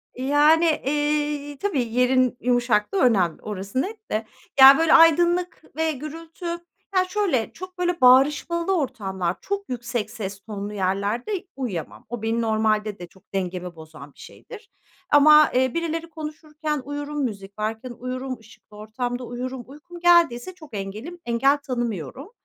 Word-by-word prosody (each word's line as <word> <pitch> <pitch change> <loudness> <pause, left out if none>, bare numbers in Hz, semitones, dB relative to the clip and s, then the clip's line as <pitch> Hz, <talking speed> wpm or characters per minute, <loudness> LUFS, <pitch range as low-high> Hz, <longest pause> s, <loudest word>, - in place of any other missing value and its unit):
E, 255 - -6
yani, 300 +4 +4 0.2
eee, 295 0 -1
tabii 360 -9 0
yerin 250 0 +2
yumuşaklığı 245 - +1
önemli 190 -9 +2
orası 205 +4 -3
net 435 +2 -7
de. 215 +1 -1 0.3
Ya, 270 +1 +10
böyle, 325 -1 +3
aydınlık 345 +1 +4
ve 320 0 +1
gürültü 320 +4 -9 0.5
Ya 370 0 +4
şöyle: 365 - 0
Çok, 370 +1 -10
böyle, 355 -2 -1
bağırışmalı 295 +8 +4
ortamlar, 195 - -2
çok 400 0 -4
yüksek 240 -3 -3
ses 200 -4 -6
tonlu 205 +1 -6
yerlerde 205 - -2
uyuyamam. 220 - -5
O 240 -1 -5
benim 225 +1 0
normalde 215 -2 0
de 175 - -8
çok 190 +3 -25
dengemi 180 -2 -3
bozan 155 -3 -12
bir - - -25
şeydir 455 -3 -12 0.4
ama, 300 +1 +7
eee, 255 0 +2
birileri 335 0 -3
konuşurken 305 -1 -5
uyurum, 290 +1 -4
müzik 205 -4 -6
varken 220 +4 -3
uyurum, 255 +1 -4
ışıklı 215 -1 -18
ortamda 245 +4 -4
uyurum. 250 +1 -5
Uykum 300 +6 -12
geldiyse 340 -4 +3
çok 310 -8 -15
engelim 215 - -6
engel 255 +5 +3
tanımıyorum. 240 - -5
255 Hz, 140 wpm, -23 LUFS, 215-315 Hz, 0.5 s, Ya